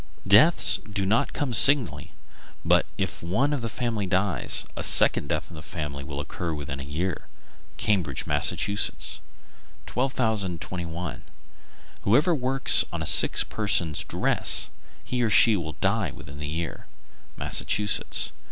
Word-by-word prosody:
Deaths 120 - +5
do 100 -1 -2
not 105 +4 0
come 145 -5 -4
singly; 115 - +5 0.5
but - - +2
if - - -4
one 115 - -1
of 135 -5 -4
a 115 - -3
family 115 -3 -4
dies, 95 -1 -1
a - - -5
second 70 - +3
death 75 +1 -4
in - - -11
the 75 - -10
same 90 - -12
family 70 -2 -6
will 70 0 -7
occur 80 +3 -5
within 70 -2 -7
a - - -7
year. 75 +5 -5 0.5
Cambridge, 95 - -1
Mass. 75 0 +1
1221. 95 - -4 0.8
Whoever 140 - +2
works 135 -2 +5
on - - -5
a - - -6
sick - - +6
person's 85 -7 0
dress, - - 0 0.3
he 125 -1 -4
or 115 - 0
she 105 +3 +5
will 80 -5 -5
die 100 -1 0
within 70 +1 -12
the 75 - -6
year. 80 +1 -6 0.5
_Massachusetts. 105 0 -1
95 Hz, 140 wpm, -24 LUFS, 80-115 Hz, 0.8 s, sick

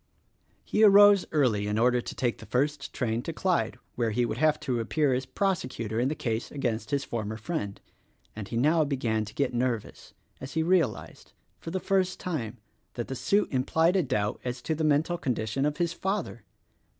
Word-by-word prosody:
He 215 - +1
arose 205 -1 +7
early 120 -9 +2
in 105 +1 -1
order 125 +1 +3
to - - -7
take 120 -2 -1
the - - -11
first 140 +2 -1
train 115 -2 -1
to 165 - -4
Clyde' 180 +2 0 0.2
where 120 -2 0
he 120 +3 +1
would 115 0 -4
have 155 0 +3
to 130 -5 -1
appear 135 +5 +1
as 130 +1 -2
prosecutor 130 - -2
in 125 - +2
the 150 - -1
case 115 -4 -3
against 120 -5 -3
his 140 -1 0
former 110 -3 -4
friend; 110 -5 -4 0.6
and 105 -2 -6
he 115 - -3
now 155 +6 +3
began 120 -7 -1
to 105 - -10
get 135 -3 0
nervous 120 -3 -3 0.2
as 135 - -8
he 160 - +1
realized, 165 -9 -1 0.3
for - - -7
the 185 +3 -2
first 185 -1 0
time, 125 -10 -4 0.4
that 120 - -4
the 135 - -3
suit 200 +10 +1
implied 160 +7 +2
a 190 - +4
doubt 120 -8 -1
as 125 0 -3
to 160 - -1
the 160 +1 -2
mental 155 +3 +2
condition 125 0 -1
of 150 - -3
his 170 -1 0
father. 190 - -3
135 Hz, 195 wpm, -28 LUFS, 115-160 Hz, 0.6 s, arose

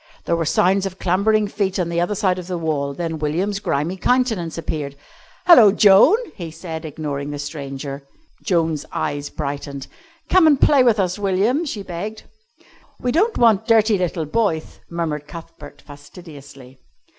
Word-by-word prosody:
There 170 - +1
were 165 -1 -1
sounds 185 +5 +2
of 190 -1 -9
clambering 205 +4 +1
feet 195 -2 -2
on 175 -3 -1
the 170 0 0
other 175 +4 -1
side 185 -2 0
of 180 - -9
the 180 -1 -3
wall, 150 -4 -2
then 165 -1 -4
William's 180 +7 -1
grimy 165 +1 -2
countenance 220 -8 0
appeared. 150 -4 -4 0.5
"Hello, 240 - +8
Joan!" 205 - +6 0.2
he 170 -4 -7
said, 160 0 -7
ignoring 145 -2 -5
the 145 - -5
stranger. 140 -1 -6 0.4
Joan's 165 -6 0
eyes 145 0 -3
brightened. 140 -2 -5 0.4
"Come 365 -3 +5
and 290 -3 +4
play 285 -3 +5
with 235 -4 +3
us, 185 +1 -1
William," 205 - +1
she 215 -9 -5
begged. 205 +5 -6 0.8
"We 250 - -1
don't 415 - +1
want 220 -2 +3
dirty 220 -3 +3
little 175 -3 -2
boyth," 160 -1 -2
murmured 155 -4 -3
Cuthbert 165 -3 -12
fastidiously. 145 -3 -14
175 Hz, 155 wpm, -20 LUFS, 150-205 Hz, 0.8 s, Hello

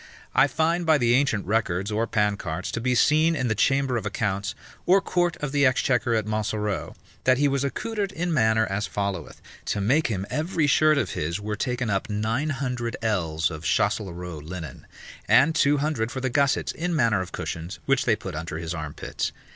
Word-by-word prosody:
I 135 - +5
find 165 +5 +1
by 160 -2 +4
the 120 -3 +2
ancient 125 -6 +2
records 100 -1 0
or 110 +2 0
pancarts, 100 -6 -1
to 115 - -3
be 125 +1 +1
seen 155 +6 +4
in 130 -5 -1
the - - +2
chamber 135 +3 +2
of 110 - -4
accounts, 105 -1 -2 0.3
or 190 +2 +6
court 175 -3 0
of 145 -2 -4
the 145 0 +2
exchequer 125 -2 +2
at 110 -2 0
Montsoreau, 105 -2 -2 0.3
that 130 0 +5
he 145 +2 +3
was 140 -1 0
accoutred 200 +8 -2
in 175 -1 -2
manner 110 -5 +3
as 100 +1 -2
followeth. 100 -1 -4 0.2
To - - -1
make 135 +11 +2
him 100 -4 -2
every 160 0 0
shirt 155 +1 +4
of 110 -11 0
his 80 +5 -2
were 105 +1 -3
taken 125 +1 -2
up 100 +2 -1
nine 110 +8 -1
hundred 125 -4 -3
ells 85 -8 0
of 75 0 -7
Chasteleraud 85 0 -1
linen, 85 -1 -8 0.4
and 140 +6 +5
two 145 -1 +3
hundred 140 -6 -1
for 130 - -4
the 130 -1 -2
gussets, 140 +1 +2
in 175 +1 -2
manner 115 -9 +2
of 90 - -6
cushions, 85 +4 -5
which 135 -1 +2
they 115 - +3
put 95 -3 -7
under 75 0 -5
his 80 +1 -4
armpits. 75 -3 -4
115 Hz, 195 wpm, -25 LUFS, 100-140 Hz, 0.4 s, or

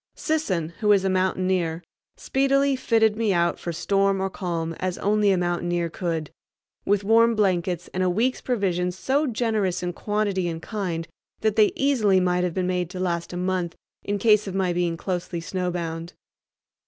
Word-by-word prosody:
Sisson, 195 - -1
who 210 -2 +3
is 195 -1 +2
a 190 - +2
mountaineer, 185 -2 0 0.3
speedily 275 +1 +2
fitted 225 -4 +2
me 220 -2 +1
out 170 -1 +1
for 170 - -4
storm 195 +3 +1
or 190 0 -1
calm 165 -4 -3
as 185 -1 -2
only 210 0 +2
a 190 - +2
mountaineer 175 -1 -1
could, 165 -4 -3 0.5
with 205 0 +2
warm 230 +2 +4
blankets 180 -4 0
and 185 - -1
a 185 - +2
week's 230 +8 0
provisions 180 -6 -1
so 280 +8 +1
generous 215 -7 0
in 175 0 -2
quantity 205 -2 -1
and 165 -1 -5
kind 180 -6 -3 0.3
that 215 -1 +1
they 215 -1 +5
easily 225 -9 +3
might 180 0 +1
have 180 -2 -2
been 185 -1 0
made 180 -2 -1
to 180 0 -7
last 170 -2 -2
a 175 - -5
month 180 -2 -1 0.3
in 205 0 -1
case 210 0 +4
of 190 - -4
my 185 -2 +1
being 175 -1 0
closely 175 -1 -3
snowbound. 170 -1 -4
185 Hz, 175 wpm, -24 LUFS, 175-210 Hz, 0.5 s, they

